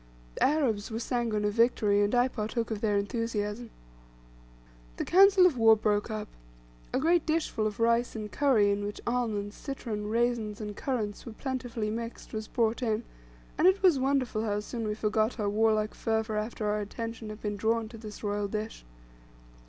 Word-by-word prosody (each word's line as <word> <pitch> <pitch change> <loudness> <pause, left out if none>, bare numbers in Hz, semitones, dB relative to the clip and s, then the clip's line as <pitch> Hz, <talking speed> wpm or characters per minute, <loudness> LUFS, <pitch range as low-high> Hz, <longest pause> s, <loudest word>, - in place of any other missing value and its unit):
The - - -1
Arabs 260 -9 +1
were 220 - -4
sanguine 230 -3 -1
of 205 - 0
victory, 215 -3 +3
and 205 +4 +2
I 245 +1 +4
partook 230 -1 -3
of 215 -2 -3
their 210 -2 +2
enthusiasm. 220 +1 -2 1.3
The - - -2
council 385 0 +6
of 305 -9 +3
war 225 -1 +7
broke 210 0 0
up. 215 -1 -4 0.6
A - - 0
great 335 +3 +3
dishful 310 -9 0
of 210 0 -6
rice 235 +1 +2
and 210 -1 -5
curry, 235 -8 +3
in 200 0 -1
which 205 0 -5
almonds, 220 -4 -1
citron, 225 -7 -5
raisins, 230 -2 0
and 210 -2 -5
currants 220 -6 -3
were 230 - -6
plentifully 245 -4 -3
mixed, 230 +2 -6
was 215 0 -4
brought 230 +1 0
in, 225 -1 0 0.6
and 350 - +6
it 380 +1 +3
was 345 -8 +5
wonderful 260 -4 0
how 205 -2 0
soon 225 +1 -4
we 210 - -1
forgot 215 +2 0
our 205 -1 0
warlike 215 0 +2
fervor 220 -1 -1
after 215 +1 -3
our 210 0 +1
attention 225 +1 -6
had 215 0 -8
been 205 -1 -2
drawn 225 +2 0
to 230 - -10
this 215 -1 -9
royal 205 0 -1
dish. 215 +2 -5
220 Hz, 180 wpm, -29 LUFS, 210-240 Hz, 1.3 s, war